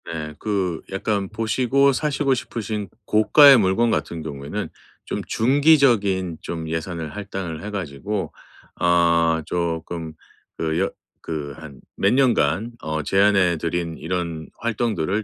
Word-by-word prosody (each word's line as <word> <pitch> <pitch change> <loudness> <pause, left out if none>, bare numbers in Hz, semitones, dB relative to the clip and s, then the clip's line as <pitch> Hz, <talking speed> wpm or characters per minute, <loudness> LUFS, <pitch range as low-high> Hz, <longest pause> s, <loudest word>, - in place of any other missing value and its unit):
네. 75 -2 -5
그 95 -6 -1
약간 100 0 -1
보시고 125 +5 +2
사시고 145 -1 0
싶으신 105 -5 -4 0.2
고가의 135 +6 +7
물건 110 +3 +2
같은 85 -6 -2
경우에는 70 -2 -5 0.4
좀 - - -3
중기적인 115 - +3
좀 80 -2 -5
예산을 80 -1 -4
할당을 95 -5 -5
해 105 - -5
가지고 95 +1 -4 0.5
어 85 -1 +3
쪼끔 85 -1 -3 0.4
그 80 0 -1
여 95 - +1 0.3
그 75 -3 -4
한 75 -4 -11 0.2
몇 100 - +2
년간 115 - +2
어 80 0 -3
제안해 95 -1 +3
드린 85 0 -2
이런 85 -2 -3
활동들을 110 -4 -1
95 Hz, 245 characters per minute, -22 LUFS, 80-110 Hz, 0.5 s, 고가의